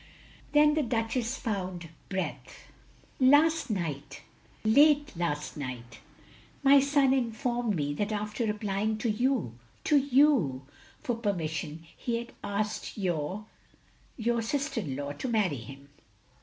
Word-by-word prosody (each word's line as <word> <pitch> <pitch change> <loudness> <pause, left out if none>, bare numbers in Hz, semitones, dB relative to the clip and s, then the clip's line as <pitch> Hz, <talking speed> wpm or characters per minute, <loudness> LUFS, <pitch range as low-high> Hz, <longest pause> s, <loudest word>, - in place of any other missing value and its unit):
Then 300 0 +6
the 310 - +2
Duchess 235 0 -1
fotmd 185 - -3 0.2
breath. 190 -1 -5 0.5
"Last 290 +4 +5
night 160 -9 -4 0.2
— - - -30
^late 290 +4 +5
last 155 -4 -2
night, 120 -5 -7 0.6
my 280 0 +8
son 280 -1 +3
informed 240 -2 0
me, 145 -2 -1
that 205 +8 -2
after 210 +2 -2
applying 210 +1 -1
to 220 +1 0
you, 220 - 0 0.2
to 300 - +4
you, 260 - +3 0.4
for 245 - 0
per 220 -3 0
mission, 160 -1 -4
he 235 - -2
had 235 0 -6
asked 210 +2 -3
your 185 +1 -2 0.4
— - - -31
^your 235 0 +1
sister 280 +1 -1
in 140 -8 -4
law 140 +1 -4
to 145 - -5
marry 210 - +1
him. 135 +4 -11
215 Hz, 135 wpm, -29 LUFS, 165-255 Hz, 0.6 s, my